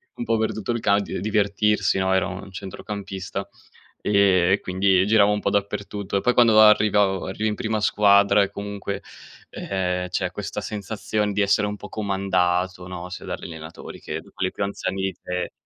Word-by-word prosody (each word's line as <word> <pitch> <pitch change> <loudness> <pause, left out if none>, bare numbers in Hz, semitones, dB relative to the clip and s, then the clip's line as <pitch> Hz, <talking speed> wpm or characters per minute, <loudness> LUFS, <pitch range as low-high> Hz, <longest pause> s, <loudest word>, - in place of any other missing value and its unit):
un 240 - -4
po' 115 - +1
per 110 - +1
tutto 110 +2 -3
il 115 - -1
cad 100 -2 +2
e - - -3
divertirsi, 105 0 +1
no, 95 0 +1
ero 95 0 +1
un 95 +1 -8
centrocampista, 95 0 -6 0.5
ehm, 95 -3 +3
e 105 - +2
quindi 95 0 +2
giravo 105 -1 +5
un 105 - 0
po' - - +1
dappertutto. 100 0 -2
E - - -1
poi 125 - +2
quando 115 -3 +6
arrivavo 105 -2 +4
arrivi 110 +3 -1
in 105 - -2
prima 110 0 -2
squadra 100 -1 +4
e 100 - -3
comunque, 100 -1 -5 0.5
ehm, 90 -1 -2
c'è 90 0 -1
questa 100 0 -5
sensazione 105 0 -3
di 105 - +1
essere 100 +1 +3
un 105 0 -4
po' - - -10
comandato, 95 -3 0
no, 90 0 -7
sia 90 - -8
dagli - - -5
allenatori 80 -1 -9
che - - -5
da - - -18
quelli - - -2
più - - -8
anziani 95 -1 -3
di 95 0 -1
te. 90 0 -4
100 Hz, 190 wpm, -23 LUFS, 95-105 Hz, 0.5 s, quando